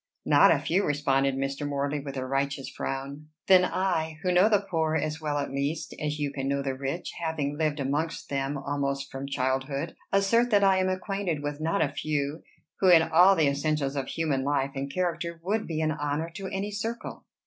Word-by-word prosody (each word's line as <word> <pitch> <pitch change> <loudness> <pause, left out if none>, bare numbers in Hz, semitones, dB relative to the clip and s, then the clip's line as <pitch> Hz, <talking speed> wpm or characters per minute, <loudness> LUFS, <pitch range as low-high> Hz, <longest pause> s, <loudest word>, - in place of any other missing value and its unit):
"Not 145 -1 +6
a 165 - +5
few," 165 +7 0
responded 140 -3 +1
Mr. 135 +2 -2
Morley 140 +1 -1
with 140 -1 -7
a 130 - -2
righteous 135 +1 -1
frown. 140 +3 -5 0.2
"Then 185 -1 +7
I, 165 -4 -1
who 180 - +2
know 180 +4 +5
the 205 -2 +2
poor 160 -2 0
as 155 0 -2
well 150 -1 -1
at 145 - -2
least 140 +3 -2
as 150 0 -1
you 145 -2 -2
can 135 -1 -4
know 140 0 0
the 135 -1 -1
rich, 135 +6 -4
having 150 -3 -1
lived 155 -1 0
amongst 145 +4 -2
them 140 0 -2
almost 140 0 -2
from 135 +1 -5
childhood, 135 +3 -2 0.2
assert 215 +5 +3
that 205 -3 +4
I 195 -1 +5
am 185 0 +1
acquainted 185 -4 -2
with 145 +1 -4
not 165 +5 +1
a - - -2
few, 150 0 -2 0.4
who, 190 - +4
in 165 -2 +8
all 180 +4 +6
the 155 -4 +3
essentials 140 0 0
of 135 -2 -2
human 150 -5 -1
life 140 -1 0
and 140 0 -4
character, 170 -1 -2
would 210 +4 -1
be 160 -1 -2
an 155 0 +1
honor 150 +2 -2
to 195 +3 -6
any 195 +2 -3
circle." 225 +3 -5
150 Hz, 205 wpm, -27 LUFS, 140-170 Hz, 0.4 s, in